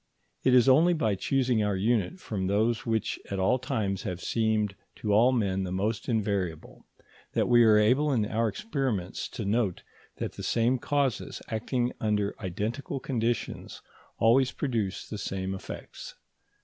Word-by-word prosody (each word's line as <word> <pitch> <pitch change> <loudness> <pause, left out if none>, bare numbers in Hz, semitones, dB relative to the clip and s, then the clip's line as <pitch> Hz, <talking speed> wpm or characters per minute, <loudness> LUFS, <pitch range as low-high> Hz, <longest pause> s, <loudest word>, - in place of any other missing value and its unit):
It 130 -1 +5
is 125 0 +6
only 160 +7 +6
by 130 -10 +1
choosing 125 +2 +1
our 105 -1 0
unit 110 - 0
from 95 - -3
those 110 +4 +1
which 110 -1 -1
at 100 - -3
all 95 +7 +2
times 110 -8 -2
have 90 -1 -4
seemed 110 -2 0 0.2
to 105 -2 -1
all 115 +5 +5
men 100 -6 0
the 90 - -4
most 105 +6 -2
invariable, 100 -8 -2 0.5
that - - +1
we 120 -1 +6
are 110 -2 +6
able 130 +8 +3
in 115 -6 +2
our 115 +2 0
experiments 135 - -3
to 110 - -5
note 105 -2 0 0.3
that - - -3
the - - -9
same 120 +2 +1
causes 140 -3 -1
acting 120 +3 -1
under 105 -2 0
identical 110 - -3
conditions 120 -3 -3 0.3
always 125 +3 +4
produce 115 -9 -2
the 105 - -6
same 95 -1 -3
effects. 95 - -8
110 Hz, 155 wpm, -28 LUFS, 100-125 Hz, 0.5 s, is